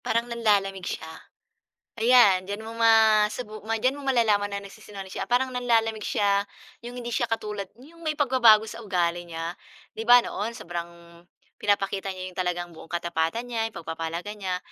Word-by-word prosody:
parang 230 Hz, +1 st, 0 dB
nanlalamig 205 Hz, -6 st, 0 dB
siya? -, -, -4 dB, 0.9 s
Ayan 225 Hz, -5 st, +6 dB
diyan 205 Hz, +2 st, -5 dB
mo 225 Hz, -, -6 dB
masubu 220 Hz, -1 st, +3 dB
diyan 225 Hz, +4 st, 0 dB
mo -, -, -9 dB
malalaman 215 Hz, -6 st, +2 dB
na 200 Hz, -, -3 dB
nagsisinungaling 195 Hz, -1 st, -10 dB
siya 195 Hz, -, -3 dB
parang 255 Hz, +1 st, +1 dB
nanlalamig 225 Hz, -3 st, +1 dB
siya, 200 Hz, -1 st, +2 dB, 0.4 s
'yung 245 Hz, +1 st, -7 dB
hindi 240 Hz, -1 st, -5 dB
siya 240 Hz, -, 0 dB
katulad 210 Hz, -3 st, -3 dB
'yung 335 Hz, +5 st, -16 dB
may 310 Hz, -2 st, -1 dB
pagbabago 240 Hz, -6 st, +5 dB
sa 230 Hz, +2 st, -8 dB
ugali 175 Hz, -4 st, 0 dB
niya. 165 Hz, +1 st, -5 dB, 0.4 s
Di 220 Hz, -, -3 dB
ba, 245 Hz, 0 st, +10 dB
noon, 215 Hz, +3 st, -3 dB
sobrang 170 Hz, 0 st, -8 dB, 0.4 s
pinapakita 195 Hz, -1 st, 0 dB
niya 185 Hz, 0 st, -6 dB
'yung -, -, -19 dB
talagang 175 Hz, -1 st, -2 dB
buong 160 Hz, -, -13 dB
katapatan 170 Hz, +6 st, -1 dB
niya, 225 Hz, -2 st, -1 dB
'yung -, -, -18 dB
pagpapahalaga 165 Hz, +4 st, -5 dB
niya. 190 Hz, -3 st, -3 dB
210 Hz, 165 wpm, -26 LUFS, 185-230 Hz, 0.9 s, ba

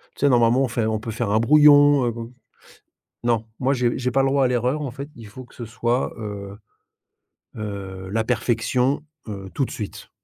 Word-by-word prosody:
tu -, -, -19 dB
sais, 140 Hz, -, +5 dB
normalement 120 Hz, +1 st, +4 dB
on -, -, +1 dB
fait 120 Hz, -2 st, -1 dB
on 110 Hz, -1 st, -1 dB
peut 115 Hz, 0 st, -6 dB
faire 110 Hz, -1 st, -2 dB
un 110 Hz, -, +3 dB
brouillon, 145 Hz, +1 st, +6 dB
heu, -, -, 0 dB
bon. 115 Hz, +1 st, -8 dB, 0.9 s
Non, 115 Hz, -2 st, +1 dB
moi 135 Hz, +2 st, +1 dB
j'ai 120 Hz, -2 st, 0 dB
j'ai 125 Hz, 0 st, -1 dB
pas 135 Hz, +2 st, +2 dB
le 135 Hz, -, +2 dB
droit 140 Hz, -1 st, +3 dB
à -, -, +3 dB
l'erreur, 125 Hz, +4 st, 0 dB
en 140 Hz, -4 st, -3 dB
fait, 140 Hz, +3 st, -8 dB
il 115 Hz, -2 st, -11 dB
faut 130 Hz, +5 st, -11 dB
que -, -, -20 dB
ce 120 Hz, -, -7 dB
soit, 120 Hz, +2 st, -1 dB
heu 100 Hz, -2 st, -7 dB, 1.0 s
heu, 95 Hz, -3 st, -6 dB
la 110 Hz, +1 st, 0 dB
perfection, 125 Hz, +4 st, 0 dB, 0.2 s
heu, 95 Hz, -2 st, -7 dB
tout 135 Hz, -, 0 dB
de -, -, -11 dB
suite. 105 Hz, -3 st, -7 dB
120 Hz, 210 wpm, -22 LUFS, 110-130 Hz, 1.0 s, brouillon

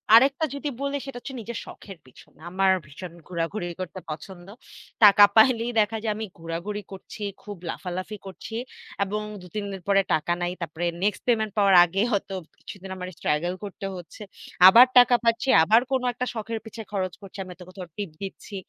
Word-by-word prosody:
আরেকটা 275 Hz, +6 st, +5 dB
যদি 290 Hz, +1 st, -3 dB
বলি 280 Hz, 0 st, -1 dB
সেটা 275 Hz, -2 st, -7 dB
হচ্ছে 270 Hz, +2 st, -8 dB
নিজের 230 Hz, +1 st, -6 dB
শখের 195 Hz, -3 st, -11 dB
পিছনে। 130 Hz, -, -19 dB
আমার 190 Hz, +1 st, +2 dB
ভীষণ 160 Hz, +5 st, -10 dB
ঘুরাঘুরি 175 Hz, +2 st, -3 dB
করতে 185 Hz, +1 st, -6 dB
পছন্দ। 175 Hz, +3 st, -8 dB, 0.6 s
টাকা 205 Hz, 0 st, +9 dB
পাইলেই 230 Hz, +1 st, +5 dB
দেখা 215 Hz, +1 st, +1 dB
যায় 215 Hz, -2 st, 0 dB
আমি 220 Hz, +1 st, -4 dB
ঘোরাঘুরি 170 Hz, +6 st, -4 dB
করছি, 195 Hz, +2 st, -9 dB, 0.2 s
খুব 205 Hz, -2 st, -8 dB
লাফালাফি 185 Hz, +4 st, -5 dB
করছি। 195 Hz, +3 st, -8 dB, 0.5 s
এবং 210 Hz, +2 st, -3 dB, 0.2 s
২-৩ 200 Hz, +3 st, -6 dB
দিন 190 Hz, -1 st, -7 dB
পরে 195 Hz, 0 st, +5 dB
টাকা 160 Hz, +2 st, +1 dB
নাই। 175 Hz, 0 st, -1 dB
তারপরে 170 Hz, +1 st, -4 dB, 0.2 s
নেক্সট 205 Hz, -1 st, 0 dB
পেমেন্ট 220 Hz, -3 st, +2 dB
পাওয়ার 200 Hz, -2 st, +5 dB
আগে 185 Hz, +3 st, -1 dB
হয়তো 200 Hz, -2 st, -1 dB, 0.3 s
কিছুদিন 195 Hz, -1 st, -10 dB
আমার 180 Hz, 0 st, -6 dB
স্ট্রাগল 170 Hz, +4 st, 0 dB
করতে 200 Hz, -1 st, -7 dB
হচ্ছে। 180 Hz, +4 st, -11 dB, 0.5 s
আবার 230 Hz, +6 st, +10 dB
টাকা 245 Hz, 0 st, +7 dB
পাচ্ছি, 230 Hz, +3 st, +1 dB
আবার 220 Hz, +8 st, +5 dB
কোন 265 Hz, -1 st, +2 dB
একটা 250 Hz, -, -3 dB
শখের 225 Hz, 0 st, -4 dB
পিছে 220 Hz, +1 st, -8 dB
খরচ 185 Hz, -3 st, -2 dB
করছে। 195 Hz, -1 st, -12 dB
আমি 185 Hz, -, -12 dB
হয়তো 180 Hz, 0 st, -12 dB
কোথাও 185 Hz, -1 st, -9 dB
টিপ 205 Hz, -3 st, -4 dB
দিচ্ছি। 195 Hz, +1 st, -8 dB
200 Hz, 175 wpm, -25 LUFS, 180-225 Hz, 0.6 s, আবার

